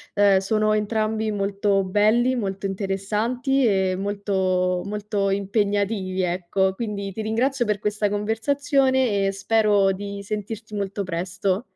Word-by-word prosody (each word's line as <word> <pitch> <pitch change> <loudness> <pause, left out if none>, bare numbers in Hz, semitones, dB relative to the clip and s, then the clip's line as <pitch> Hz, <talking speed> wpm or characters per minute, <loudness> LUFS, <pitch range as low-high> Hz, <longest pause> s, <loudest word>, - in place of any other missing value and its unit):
Uhm, 200 -1 +5
sono 215 +2 +1
entrambi 215 +1 0
molto 200 0 0
belli, 215 +6 +2
molto 195 -3 -3
interessanti 210 +8 -1
e 190 -2 +2
molto, 190 -2 0
molto 205 -1 -2
impegnativi, 200 -1 0
ecco. 185 +2 0
Quindi, 200 -2 -4
ti 220 - -5
ringrazio 240 +4 0
per 210 -1 0
questa 210 0 -1
conversazione 255 +1 +1
e - - +1
spero 205 -1 +2
di 200 +1 -6
sentirti 215 +1 -6
molto 200 0 -3
presto. 185 +3 -2
205 Hz, 120 wpm, -23 LUFS, 195-220 Hz, -, Uhm